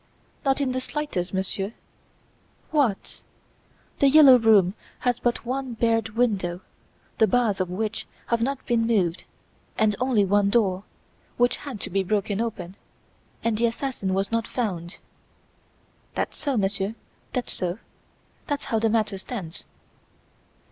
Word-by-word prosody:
"Not 270 -1 +2
in 275 -2 0
the 255 0 -1
slightest, 255 -11 -3
Monsieur." 195 +2 -2 1.0
"What! 275 -10 0 0.8
"The 280 - +6
Yellow 275 -3 +8
Room" 205 -5 +5 0.3
has 245 -1 +1
but 240 0 -1
one 260 0 -2
barred 225 -1 +1
window 190 -7 0 0.6
the 220 - +6
bars 230 -6 +2
of 185 - -1
which 215 +4 -3 0.2
have 235 -1 0
not 270 +2 -1
been 230 -2 +1
moved 185 -7 +1 0.5
and 215 -1 +3
only 250 -5 +3
one 200 +1 +3
door, 200 -3 +1 0.5
which 245 0 +3
had 270 -7 -7
to - - -5
be 195 +2 +2
broken 205 +1 0
open 200 -5 -4 0.7
and 225 -2 0
the 235 - +4
assassin 230 -6 -2
was 195 +2 -1
not 230 0 0
found!" 180 -8 -3 1.2
"That's - - -2
so, 275 -4 -1
monsieur, 200 +1 0 0.4
that's 250 -2 -2
so. 180 +1 -2 0.7
That's 290 -2 -2
how 230 -5 0
the 225 0 +2
matter 215 -3 0
stands." 190 -6 -7
225 Hz, 140 wpm, -25 LUFS, 195-245 Hz, 1.2 s, Yellow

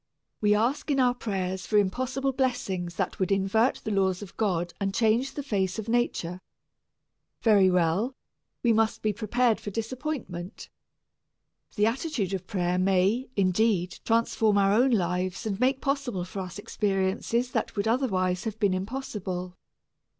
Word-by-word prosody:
We 210 -1 +4
ask 250 +9 0
in 280 -2 +2
our 250 -1 +4
prayers 190 -6 -3
for 210 - +2
impossible 260 +7 0
blessings 200 -10 -1
that - - -2
would 190 +1 0
invert 195 +5 +2
the 215 - -3
laws 190 -1 +1
of 190 - -12
God 175 -5 -1
and 195 0 -1
change 230 +4 +2
the 285 - -3
face 195 -7 -1
of 220 0 -5
nature 185 -7 -1 1.0
very 205 -4 +5
well, 180 +8 +1 0.5
we 235 -2 +4
must 220 0 +1
be 215 -1 +1
prepared 235 +2 +1
for - - -6
disappointment. 225 - -5 1.1
The 210 - +3
attitude 230 - -1
of 185 -1 -4
prayer 180 -3 0
may, 195 +7 +2
indeed, 190 -1 +1
transform 225 -2 +2
our 195 0 +4
own 245 +5 +4
lives 185 -3 0
and 205 -2 -2
make 260 +2 +2
possible 275 -10 -1
for 190 +2 -7
us 185 0 -6
experiences 205 +4 -1
that 225 - -2
would 200 +1 -1
otherwise 190 -7 +1
have 220 -1 -3
been 200 -3 +2
impossible. 185 -4 -4
210 Hz, 150 wpm, -27 LUFS, 185-240 Hz, 1.1 s, very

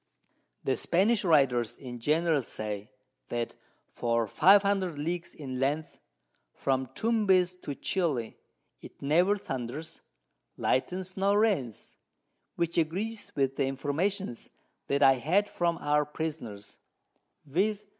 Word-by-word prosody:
_] - - -32
The 135 - +2
Spanish 210 +6 +2
Writers 135 - +3
in 125 -3 -8
general 155 +3 +2
say, 105 -3 -5 0.4
that 120 -1 -2 0.4
for 115 -1 0
500 195 - +4
Leagues 170 +3 -3
in 130 -4 -5
Length, 145 +4 -1 0.6
from 130 -1 0
Tumbez 195 -6 +3
to 145 - -5
Chili, 145 - -1 0.5
it - - -13
never 175 +8 +3
thunders, 135 -1 -6 0.6
lightens 185 +7 -1
nor 200 +1 +2
rains, 185 - 0 0.6
which 170 0 0
agrees 205 +8 -2
with 135 -1 0
the 140 - +1
Informations 145 - -2 0.4
that 140 +1 +2
I 135 - +8
had 190 +10 +2
from 170 -3 0
our 150 0 +2
Prisoners, 145 -9 -6 0.7
_viz. 200 +8 0
155 Hz, 115 wpm, -29 LUFS, 130-190 Hz, 0.7 s, I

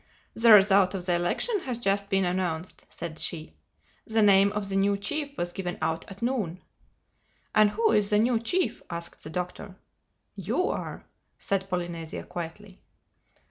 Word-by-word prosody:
"The 230 0 +5
result 195 -2 +6
of 180 -2 -5
the 180 - +1
election 175 - 0
has 255 -8 -4
just 200 -3 0
been 195 -2 +2
announced," 175 -1 -3
said 165 -2 -6
she. 160 -2 -4 0.5
"The 220 -1 +2
name 200 0 +6
of 210 -1 -2
the 195 - -3
new 200 +1 +2
chief 285 +7 -3
was 175 0 -3
given 180 -2 -4
out 160 +1 -2
at 195 +3 -9
noon." 210 -9 -2 0.9
"And 215 -1 +5
who 220 +2 +1
is 210 -2 +3
the 210 - +3
new 230 +2 +3
chief?" 350 +11 -1
asked 170 0 -6
the 155 - -7
Doctor. 180 +2 -5 0.6
"You 370 +3 -1
are," - - -5 0.3
said 195 -1 -2
Polynesia 175 -3 -4
quietly. 185 +3 -8
195 Hz, 160 wpm, -27 LUFS, 175-215 Hz, 0.9 s, result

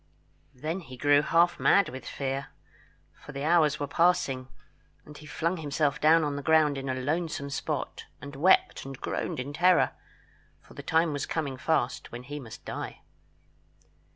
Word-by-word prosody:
Then 155 +8 -3
he 130 -7 -11
grew 145 +2 +4
half 170 +3 +3
mad 200 -2 +4
with 130 +1 -9
fear, 135 0 -3 0.7
for 145 - -13
the 140 0 -4
hours 155 -2 +3
were 145 - -1
passing, 140 -5 +1 0.6
and 150 - -12
he 150 - -12
flung 170 +4 -1
himself 145 -2 -1
down 160 +2 +5
on 145 -1 -1
the 145 - -4
ground 155 -1 +3
in 135 0 -4
a 130 - 0
lonesome 145 +1 -2
spot, 135 - -4
and 140 -1 -9
wept 175 +7 +3
and 135 -1 -8
groaned - - -3
in 140 +3 -5
terror, 180 +3 +4 0.7
for - - -18
the - - -8
time 160 -1 +1
was 145 -1 -3
coming 145 -5 -2
fast 130 -1 -1
when 120 +1 -7
he 145 +3 -6
must 115 -5 -11
die. - - -6
145 Hz, 170 wpm, -28 LUFS, 135-160 Hz, 0.7 s, down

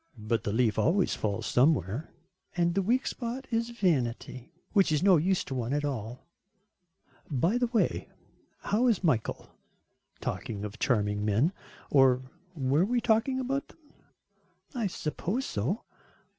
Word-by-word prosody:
"But 110 +1 -1
the 105 - 0
leaf 110 -1 +2
always 185 +3 +2
falls 100 -2 -2
somewhere." 125 - +2 0.5
"And 170 0 +2
the 195 - +2
weak 245 +7 +1
spot 250 +2 -4
is 230 +1 0
vanity 130 - -1 0.2
which 195 -5 +4
is 150 +1 +1
no 190 -3 +6
use 185 +4 +1
to - - -6
one 125 0 -2
at 145 0 0
all." 125 -3 -5 1.0
"By 170 - +1
the 245 - +2
way, 230 -1 0 0.5
how 230 +5 +1
is 220 -6 +2
Michael, 130 -10 0 0.7
talking 105 -2 -4
of 105 +1 -8
charming 105 -4 +1
men. 110 - +2 0.4
Or, 130 -2 +5 0.3
were 140 +2 +2
we 240 +5 +1
talking 230 +3 +2
about 270 +2 -2
them?" - - -20 1.0
"I 235 -6 -1
suppose 190 - -3
so." 125 - -2
155 Hz, 145 wpm, -29 LUFS, -, 1.0 s, no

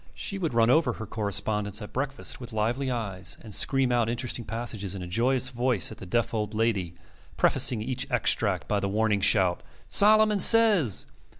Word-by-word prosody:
She 195 - -3
would 165 -9 -3
run 115 +1 +3
over 160 +4 +2
her 110 - -8
correspondence, 105 -1 -2
at 105 - -10
breakfast, 135 0 -2
with 120 -1 -10
lively 120 +5 -2
eyes, 100 -8 -3
and 110 -2 -7
scream 135 +2 +2
out 120 -2 +1
interesting 120 0 -4
passages 110 -3 -4
in 95 - -7
a - - -7
joyous 125 +7 0
voice 120 -5 -1
at - - -11
the 95 - -10
deaf 120 +6 -1
old 105 -1 -3
lady, 100 -6 -1 0.4
prefacing 110 -4 +2
each 125 +1 -3
extract - - 0
by 105 - 0
the 100 - -3
warning 105 0 0
shout, 95 -3 +2 0.3
"Solomon 215 0 +4
says!" 205 - +5
115 Hz, 180 wpm, -26 LUFS, 105-130 Hz, 0.4 s, says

